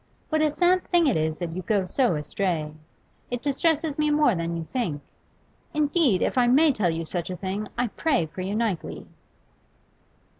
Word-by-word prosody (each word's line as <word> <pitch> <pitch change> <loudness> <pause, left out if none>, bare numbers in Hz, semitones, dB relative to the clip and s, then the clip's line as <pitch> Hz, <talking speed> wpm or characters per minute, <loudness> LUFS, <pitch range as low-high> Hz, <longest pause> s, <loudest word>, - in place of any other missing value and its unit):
What 310 -1 +1
a 310 - +3
sad 355 +5 +2
thing 345 -2 +3
it 275 - +2
is 155 0 0
that 170 -2 -5
you 185 - -3
go 200 0 0
so 245 - +1
astray 155 0 -2
t - - -17 0.6
It 245 - -8
distresses 305 +1 0
me 300 0 +2
more 295 -4 +4
than 170 -1 -2
you 165 - -5
think. 220 - -1 0.8
Indeed, 295 - +2
if - - +1
I 245 - +4
may 290 +5 +5
tell 210 -9 0
you 165 0 -3
such 175 +1 -3
a 180 - -4
thing, 195 +3 -4
I 245 - +2
pray 260 - 0
for 165 +4 -8
you 195 +3 -3
nightly. 215 -6 -2
220 Hz, 190 wpm, -25 LUFS, -, 0.8 s, may